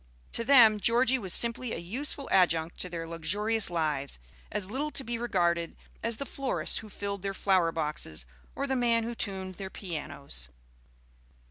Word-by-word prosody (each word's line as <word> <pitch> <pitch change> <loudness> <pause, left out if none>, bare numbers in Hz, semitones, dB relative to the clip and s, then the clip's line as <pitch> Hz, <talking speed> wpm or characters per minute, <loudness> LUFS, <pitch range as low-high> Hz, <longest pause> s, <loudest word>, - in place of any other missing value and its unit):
To 230 - +1
them, 230 -5 +6
Georgie 250 +4 +3
was 190 -5 -3
simply 235 +4 +4
a - - -3
useful 265 +10 -3
adjunct 165 -2 +2
to 180 - 0
their 165 -1 -5
luxurious 205 +6 +3
lives, 150 - -2 0.3
as 205 -3 -2
little 285 +5 -2
to 280 - -1
be 235 -1 -4
regarded 170 -7 0 0.3
as 230 -1 0
the 280 - -4
florist 275 -1 0
who 215 - -11
filled 200 0 -5
their 195 0 -4
flower 185 -5 +2
boxes 150 - -2 0.3
or 275 - -2
the 270 -1 -1
man 235 -2 +2
who 235 +1 -4
tuned 190 -4 -4
their 190 -1 -6
pianos. 145 - -5
200 Hz, 165 wpm, -29 LUFS, 170-235 Hz, 0.3 s, them